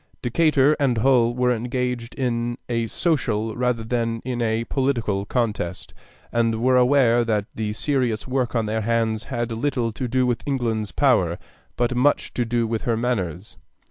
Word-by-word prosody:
Decatur 145 +2 +3
and 130 -5 +2
Hull 120 0 +3
were 125 0 +2
engaged 125 0 -3
in 120 -2 -1
a 115 -1 -1
social 115 -9 -1
rather 125 -2 0
than 115 0 -1
in 125 -2 -2
a 115 0 0
political 115 -7 -1
contest, 105 -8 -2 0.4
and 115 -1 +1
were 130 +2 +3
aware 125 -2 +4
that 105 -3 0
the 105 -1 -3
serious 125 -3 -1
work 130 -1 -1
on 115 -2 +1
their 110 +1 -1
hands 115 0 0
had 120 -3 -3
little 120 0 -1
to 125 +3 -4
do 130 +1 +1
with 120 -2 0
England's 115 -6 -1
power, 95 - +2 0.4
but 120 0 0
much 130 +4 +1
to 120 - -1
do 120 0 0
with 110 0 -2
her 115 -2 0
manners. 105 -6 -3
120 Hz, 165 wpm, -23 LUFS, 110-125 Hz, 0.4 s, aware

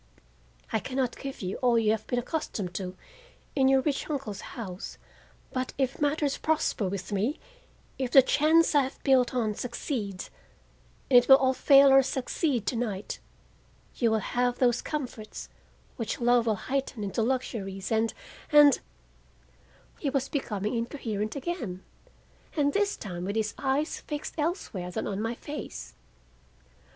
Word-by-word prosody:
I 220 - +3
can 260 +4 -6
not 255 -3 0
give 270 -6 -7
you 185 +1 -3
all 245 -2 +3
you 220 -2 +3
have 220 -1 -2
been 245 - -1
accustomed 240 - -3
to 185 0 -5 0.6
in 265 -2 +4
your 265 0 +5
rich 285 +1 -2
uncle's 265 -9 -3
house, 190 -7 -7 0.6
but 255 -1 -2
if 265 0 -1
matters 290 -1 +1
prosper 305 -10 0
with 190 0 -5
me, 210 +9 0 0.6
if 260 -2 -1
the 270 +1 +8
chance 315 +5 +4
I 290 - +6
have 265 0 -5
built 260 -2 +3
on 220 -4 +1
succeeds—and 225 -4 -4 0.9
it - - -12
will 265 -1 +7
fail 275 +1 +7
or 270 0 +8
succeed 260 - -1
tonight—you 65 - -4
will 220 - +2
have 245 0 0
those 245 -2 +2
comforts 250 -8 -5 0.5
which 230 -4 -3
love 240 -1 +3
will 220 - +3
heighten 260 0 -3
into 200 +3 -1
luxuries 220 -6 -2
and—and—" 275 +6 +3 1.2
He 290 - -1
was 275 -1 -1
becoming 210 -7 -2
incoherent 230 -3 -3
again, 255 - -4 0.7
and 285 -1 +2
this 405 0 +1
time 180 -4 -6
with 200 +3 -3
his 215 -1 0
eyes 280 +3 0
fixed 295 -1 -5
elsewhere 295 - -2
than 180 - -3
on 200 0 -3
my 225 +2 -2
face. 295 +4 -7
245 Hz, 140 wpm, -28 LUFS, 210-275 Hz, 1.2 s, the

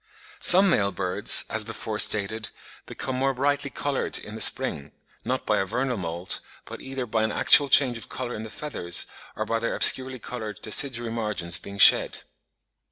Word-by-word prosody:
Some 190 +3 +5
male 100 -9 +1
birds, 90 -2 +1
as - - -1
before - - -6
stated, 110 +2 +1 0.4
become 130 - -5
more 135 +1 -1
brightly 145 +2 -1
coloured 140 +1 -2
in 105 - -8
the 110 - -8
spring, 70 -7 +1 0.3
not - - -3
by - - +1
a 95 - -1
vernal 125 +6 -2
moult, 85 -2 -3 0.3
but - - -10
either 135 -1 -6
by 110 -1 -1
an 110 -1 -1
actual 145 +5 +4
change 125 -5 +4
of - - -10
colour 125 -2 -6
in 110 - -6
the 110 - -8
feathers, 105 -10 -3 0.3
or 110 - -4
by 115 +1 -2
their 115 - -3
obscurely 130 0 +4
coloured 110 -3 -8
deciduary 120 +1 +2
margins 105 -6 -3
being 100 0 -11
shed. - - +6
115 Hz, 175 wpm, -24 LUFS, 105-130 Hz, 0.4 s, shed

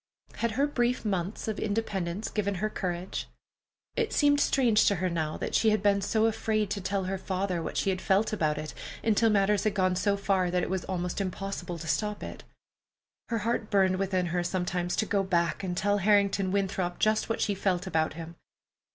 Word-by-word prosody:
Had 230 -1 0
her 275 +5 +2
brief 245 -4 0
months 195 0 -2
of 215 -1 -2
independence 205 -3 -2
given 200 -2 -1
her 215 +4 -2
courage? 180 0 -3 0.7
It 455 -2 0
seemed 290 -1 +4
strange 245 -7 +3
to 200 - +4
her 185 0 -1
now 160 -2 -2
that - - -4
she 225 - +4
had 215 -2 +1
been 200 -1 +3
so 220 +3 +2
afraid 215 -2 0
to 205 - -2
tell 195 +1 -1
her 190 +1 -3
father 185 -2 -2
what - - -4
she 195 -1 +1
felt 195 +4 +1
about 155 -7 +1
it 155 0 -5 0.3
until 225 +1 +3
matters 205 -1 +3
had 215 -1 0
gone 185 -2 +2
so 200 +2 +1
far 190 -2 +1
that 180 0 0
it - - -3
was 190 -2 -2
almost 180 0 -2
impossible 185 -2 -4
to 165 - -8
stop 210 +7 -1
it. - - -8 0.9
Her 230 - 0
heart 230 -2 -1
burned 190 -2 +3
within 190 -1 0
her 175 -1 +1
sometimes 180 0 -1
to 220 - +1
go 205 -2 +1
back 175 -1 0
and 180 -2 -3
tell 205 +2 +2
Harrington 200 -1 +3
Winthrop 190 -2 -1
just 215 +1 +1
what 225 - -1
she 205 - +1
felt 190 -1 0
about 160 -5 0
him. 165 +1 -8
195 Hz, 200 wpm, -28 LUFS, 180-210 Hz, 0.9 s, seemed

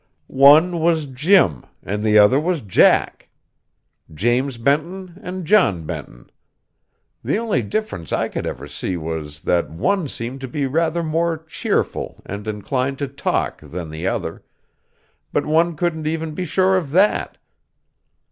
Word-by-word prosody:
One 150 +6 +5
was 160 -1 +2
Jim, 140 - +3 0.2
and 105 +2 -3
the 110 -1 +4
other 105 +6 +6
was 170 0 -1
Jack; 100 -4 +2 0.8
James 120 - 0
Benton 170 +8 -1
and 185 -3 -6
John 155 - +3
Benton. - - -8 0.9
The 140 - 0
only 220 - 0
difference 115 - -4
I - - +1
ever 65 +3 -4
could 75 - -13
see 90 +4 -3
was, 80 -2 -5
that 85 -1 0
one 165 - 0
seemed 130 +1 -6
to 130 - -5
be 140 +3 -2
rather 165 +4 0
more 165 +1 0
cheerful 160 +1 -3
and 100 +2 -7
inclined 125 +6 -2
to 140 - -3
talk 135 +1 -2
than 85 -2 -7
the 80 +4 -4
other; - - -3 0.9
but - - 0
one 165 +2 +2
couldn't 160 -2 -2
even 160 0 -2
be 180 +4 -3
sure 190 +3 +2
of 165 -6 -3
that. 195 +4 +2
140 Hz, 145 wpm, -20 LUFS, 105-170 Hz, 0.9 s, other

